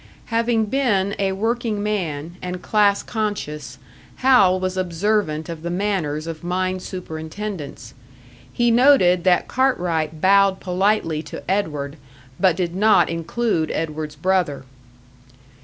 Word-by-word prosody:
Having 230 -1 +2
been 205 -5 +1
a 195 -1 +1
working 225 0 -1
man, 170 -6 -3
and 180 0 -5
class 205 -2 +2
conscious, 205 -9 -4 0.4
Hal 200 -8 +4
was 185 0 -2
observant 185 -2 -1
of 165 -2 -7
the 170 - -4
manners 175 -5 -1
of 165 -1 -7
mine 185 +1 -1
superintendents; 160 - -7 0.6
he 240 -1 +2
noted 230 -9 +5
that 180 -1 +3
Cartwright 170 - 0
bowed 195 +1 +4
politely 180 -4 0
to - - -9
Edward, 150 -7 -2 0.4
but 185 -4 +4
did 175 -2 -2
not 215 +2 +4
include 165 +1 -1
Edward's 155 -1 -4
brother. 175 -3 0
185 Hz, 120 wpm, -21 LUFS, 160-210 Hz, 0.6 s, noted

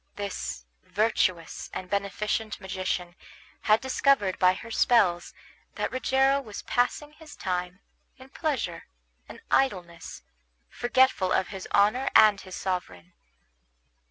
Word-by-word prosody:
This 200 - -5 0.2
virtuous 185 -5 -1
and 185 - -5
beneficent 205 +2 -2
magician 185 -2 -3 0.5
had 215 +1 +3
discovered 265 -7 +1
by 185 0 +4
her 230 +4 -9
spells 195 -8 +2 0.4
that - - -2
Rogero 270 +2 +2
was 215 -6 -9
passing 290 +4 -1
his 310 -1 -13
time 180 +1 -3 0.4
in 260 0 -14
pleasure 270 - -3 0.4
and - - -11
idleness, 180 -10 -1 0.5
forgetful 245 -6 +2
of 185 - +1
his 190 -2 -7
honor 215 +7 +3
and 210 -2 +6
his 185 -1 -9
sovereign. 95 - -4
200 Hz, 115 wpm, -27 LUFS, 185-255 Hz, 0.5 s, and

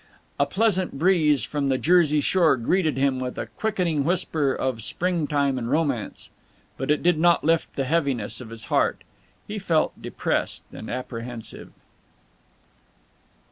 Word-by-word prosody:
A - - +3
pleasant 190 -8 +1
breeze 155 -4 +3
from 145 -2 -2
the 135 -1 +2
Jersey 155 -2 +3
shore 165 -2 +3
greeted 155 +3 +1
him 135 -1 +1
with 125 -1 -4
a - - -3
quickening 180 -9 -1
whisper 160 -4 0
of 130 -3 -2
springtime 145 - 0
and 115 -1 -4
romance, 140 -8 -2 0.4
but 135 - -5
it 150 - +2
did 175 -2 +3
not 170 +1 +4
lift 165 +1 +1
the 135 - -1
heaviness 135 -8 -1
of 115 - -9
his 115 -1 -7
heart. - - +1 0.4
He 210 0 -4
felt 165 -5 +1
depressed - - -2
and 110 - -8
apprehensive. 120 -2 -6
150 Hz, 140 wpm, -24 LUFS, 130-175 Hz, 0.4 s, not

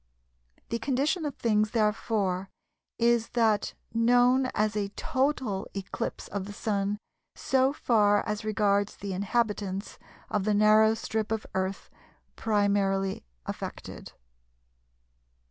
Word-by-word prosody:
The 230 - -1
condition 285 +7 0
of 290 - -3
things 215 -2 +1
therefore 210 -3 0 0.5
is 235 -1 +2
that 220 -3 +2 0.2
known 245 +3 +4
as 215 0 +1
a 205 -1 -1
"total" 260 -7 -1
eclipse 195 -1 -4
of 200 -1 -3
the 205 - -8
Sun 205 -1 -1 0.4
so 265 0 +2
far 210 -7 +3
as 210 0 -2
regards 205 -1 +1
the 200 -1 -5
inhabitants 200 -1 -2 0.3
of 205 - -1
the 210 +1 +1
narrow 215 +1 +5
strip 220 -1 -3
of 220 -1 -1
Earth 190 +1 -3 0.4
primarily 200 -3 +1 0.2
affected. - - -7
215 Hz, 110 wpm, -28 LUFS, 200-230 Hz, 0.5 s, narrow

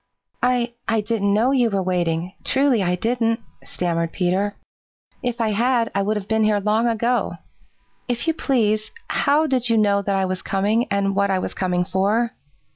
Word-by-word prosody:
"I 245 -1 +1
I 225 -1 +1
didn't 210 -1 0
know 225 +6 +3
you 250 -4 +3
were 195 -2 -1
waiting. 175 -1 -1
Truly 270 -5 +2
I 180 -1 +1
didn't," 230 +3 0 0.2
stammered 170 -2 -2
Peter. 195 +3 0 0.7
"If 245 -1 -3
I 225 -1 +1
had, 235 +2 +1
I 200 - +1
would 210 +2 0
have 200 -1 -6
been 220 0 +1
here 215 -1 +3
long 215 +3 +1
ago. 235 +2 0 0.7
If 245 +4 -1
you 325 - +3
please, 215 -8 0 0.2
how 300 +3 +2
did 255 -4 0
you 230 - +3
know 200 -2 +3
that 200 0 -1
I 190 -1 +1
was 185 0 -3
coming 210 +5 0
and 200 0 0
what 200 0 +2
I 190 - +2
was 185 - -3
coming 180 -1 0
for?" 205 +5 +1
215 Hz, 185 wpm, -22 LUFS, 195-235 Hz, 0.7 s, know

